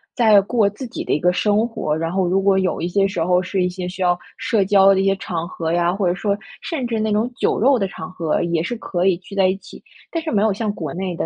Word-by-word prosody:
在 220 -4 +6
过 210 0 +1
自 235 +5 -8
己 - - -6
的 - - -4
一 - - +2
个 180 +3 +2
生 210 +4 +2
活， 155 -9 -2
然 165 +1 -2
后 190 -1 0
如 185 +2 +2
果 195 0 +3
有 185 -1 -1
一 170 - -2
些 195 +2 +2
时 180 -4 -2
候 180 +1 +2
是 185 +1 -1
一 180 - +1
些 180 0 -5
需 185 +1 -8
要 175 0 +2 0.2
社 215 -4 +1
交 195 0 +5
的 190 - +1
一 - - 0
些 195 0 +3
场 170 -3 -4
合 165 -3 -4
呀， 175 0 +2
或 195 0 -1
者 175 - +2
说， 200 +2 -1 0.2
甚 300 -8 -3
至 230 -2 -2
那 215 0 0
种 220 +4 0
酒 - - 0
肉 260 +2 +4
的 195 - 0
场 185 - -8
合 165 -4 -1
也 170 -2 0
是 205 +8 -3
可 180 -5 -2
以 185 -3 +3
聚 185 +2 -14
在 190 -1 +4
一 185 - 0
起， - - -14 0.3
但 330 - -2
是 320 - -3
没 205 - +2
有 220 -2 +2
像 210 +1 -2
国 155 -7 -5
内 185 0 -3
的， - - -2
195 Hz, 315 characters per minute, -20 LUFS, 180-210 Hz, 0.3 s, 在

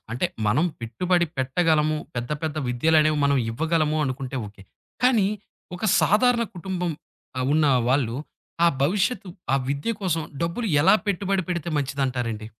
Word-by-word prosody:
అంటే 125 +9 0 0.2
మనం 145 +11 +3 0.2
పెట్టుబడి 175 +10 0
పెట్టగలము, 155 +3 +1 0.2
పెద్ద, 120 +3 -4
పెద్ద 155 -1 -3
విద్యలనేవి 155 +4 +3
మనం 140 0 +3
ఇవ్వగలము 155 +4 0
అనుకుంటే 130 0 -4
ఓకే. 100 -1 -13 0.4
కానీ, 230 -6 +4 0.5
ఒక 180 - -13 0.2
సాధారణ 235 +3 +3
కుటుంబం 180 -1 -3 0.5
ఆహ్, 130 - 0
ఉన్న 155 -1 +3 0.2
వాళ్ళు 125 -3 +1 0.5
ఆ - - +7 0.2
భవిష్యత్తు, 195 - 0 0.2
ఆ - - +4
విద్య 140 +10 -1
కోసం 165 -5 0 0.2
డబ్బులు 175 +8 -2 0.2
ఎలా 165 - +6
పెట్టుబడి 195 -1 0
పెడితే 170 -2 -2
మంచిదంటారండి? 125 -6 -2
155 Hz, 135 wpm, -24 LUFS, 130-180 Hz, 0.5 s, ఆ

